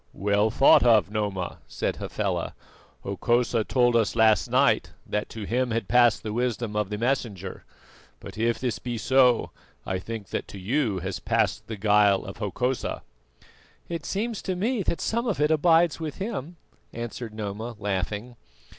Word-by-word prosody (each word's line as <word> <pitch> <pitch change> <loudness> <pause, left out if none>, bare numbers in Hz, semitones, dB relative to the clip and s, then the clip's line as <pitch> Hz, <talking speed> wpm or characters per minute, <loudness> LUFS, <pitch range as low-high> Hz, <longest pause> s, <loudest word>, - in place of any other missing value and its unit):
"Well 100 +2 +2
thought 135 +5 +6
of 110 -6 +4
Noma," 100 -4 -3
said - - -3
Hafela. - - -3 0.5
"Hokosa 120 +3 +1
told 120 +1 +2
us 115 -2 +2
last 110 -2 +4
night - - +3 0.2
that 105 - -2
to 110 - -7
him 125 +5 0
had 115 0 -2
passed 120 -4 +4
the 105 -1 -4
wisdom 120 -2 -2
of 105 -2 0
the 105 - -3
Messenger; 110 -6 -2 0.6
but - - -10
if 115 +1 +1
this 125 -5 -2
be 120 -2 -4
so, 125 0 +3 0.3
I 95 -1 -2
think 110 +1 -7
that - - -3
to - - -9
you 110 +2 0
has 95 +1 -4
passed 110 -1 0
the 110 - -5
guile 105 -1 +3
of 100 - -8
Hokosa." 125 +5 -2 0.9
"It 170 -3 -4
seems 220 +2 -2
to 185 - -2
me 220 +5 0
that 170 - -2
some 235 +2 -1
of 205 - -1
it 150 +1 +3
abides 165 +1 +4
with 155 -3 -4
him," 190 - -5 0.4
answered 120 0 -6
Noma 110 +2 -5
laughing. 105 +4 -3
115 Hz, 165 wpm, -26 LUFS, 105-130 Hz, 0.9 s, thought